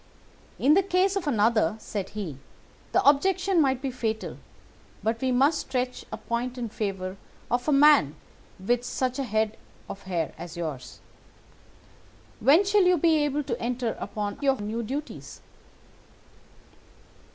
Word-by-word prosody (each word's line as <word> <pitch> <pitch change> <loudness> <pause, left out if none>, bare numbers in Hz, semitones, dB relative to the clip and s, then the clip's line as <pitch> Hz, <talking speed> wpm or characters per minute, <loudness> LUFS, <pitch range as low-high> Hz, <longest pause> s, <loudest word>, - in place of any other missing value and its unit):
"'In 285 +3 +4
the 385 - +5
case 380 +1 +1
of 370 -5 -2
another,' 215 - +2
said 205 -3 -5
he, 160 -10 -5 0.5
'the - - +2
objection 370 +5 +3
might 265 -2 +1
be 270 - -1
fatal, 225 -3 -3 0.7
but 225 +1 -1
we 260 -1 +1
must 275 +5 +3
stretch 250 -1 -3
a 220 - -4
point 235 +3 -3
in 235 -2 -3
favour 195 -3 -4 0.3
of 245 +3 0
a - - +3
man 280 - +5 0.4
with 240 +6 0
such 255 +1 -2
a - - 0
head 220 -2 -1 0.3
of 200 - -8
hair 170 -3 -1
as 170 0 -8
yours. 145 -7 -6 1.4
When 300 - +5
shall 400 -1 +4
you 360 0 +4
be 325 0 +3
able 295 0 -1
to 240 -4 -4
enter 240 -1 -2
upon 205 +1 -4
your 270 -2 +2
new 215 +3 -3
duties? 280 +7 -6
245 Hz, 145 wpm, -26 LUFS, 215-290 Hz, 1.4 s, the